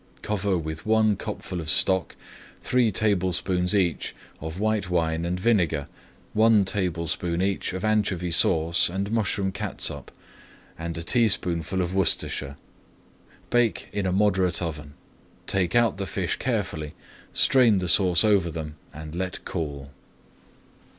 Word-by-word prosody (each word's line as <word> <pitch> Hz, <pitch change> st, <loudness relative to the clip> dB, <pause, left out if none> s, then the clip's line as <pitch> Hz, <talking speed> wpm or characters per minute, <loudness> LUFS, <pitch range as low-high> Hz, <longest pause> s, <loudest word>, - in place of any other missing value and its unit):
Cover 100 Hz, -2 st, -1 dB
with 80 Hz, -1 st, -5 dB
one 110 Hz, -1 st, +3 dB
cupful 90 Hz, -1 st, -6 dB
of 80 Hz, -, -5 dB
stock, 95 Hz, +1 st, +3 dB, 0.4 s
three 125 Hz, -3 st, +1 dB
tablespoonfuls 95 Hz, -2 st, +1 dB
each 90 Hz, -4 st, 0 dB, 0.2 s
of 80 Hz, +3 st, -6 dB
white 110 Hz, -3 st, 0 dB
wine 80 Hz, -1 st, 0 dB
and 90 Hz, +1 st, -2 dB
vinegar, 90 Hz, -9 st, +1 dB, 0.5 s
one 110 Hz, -2 st, +4 dB
tablespoonful 90 Hz, -2 st, -2 dB
each 100 Hz, 0 st, -1 dB
of 95 Hz, +3 st, -4 dB
anchovy 100 Hz, -5 st, 0 dB
sauce 80 Hz, 0 st, +3 dB
and 100 Hz, +3 st, -3 dB
mushroom 100 Hz, -3 st, 0 dB
catsup, -, -, -4 dB, 0.6 s
and 85 Hz, 0 st, -5 dB
a 85 Hz, -, -4 dB
teaspoonful 90 Hz, -4 st, +1 dB
of 90 Hz, +1 st, -4 dB
Worcestershire. 85 Hz, -7 st, +1 dB, 1.0 s
Bake 120 Hz, -2 st, +1 dB
in 100 Hz, -2 st, -1 dB
a -, -, 0 dB
moderate 95 Hz, -3 st, +2 dB
oven. 75 Hz, -4 st, -6 dB, 0.5 s
Take 95 Hz, +1 st, 0 dB
out 115 Hz, -4 st, +3 dB
the 100 Hz, -1 st, -4 dB
fish 95 Hz, -3 st, -2 dB
carefully, 100 Hz, -, -3 dB, 0.4 s
strain 125 Hz, -6 st, +4 dB
the 90 Hz, -1 st, -2 dB
sauce 90 Hz, -1 st, +4 dB
over 100 Hz, -5 st, +3 dB
them, 75 Hz, -1 st, -7 dB
and 75 Hz, +1 st, -9 dB
let 90 Hz, +1 st, -4 dB
cool. 70 Hz, -5 st, -5 dB
90 Hz, 130 wpm, -25 LUFS, 85-105 Hz, 1.0 s, one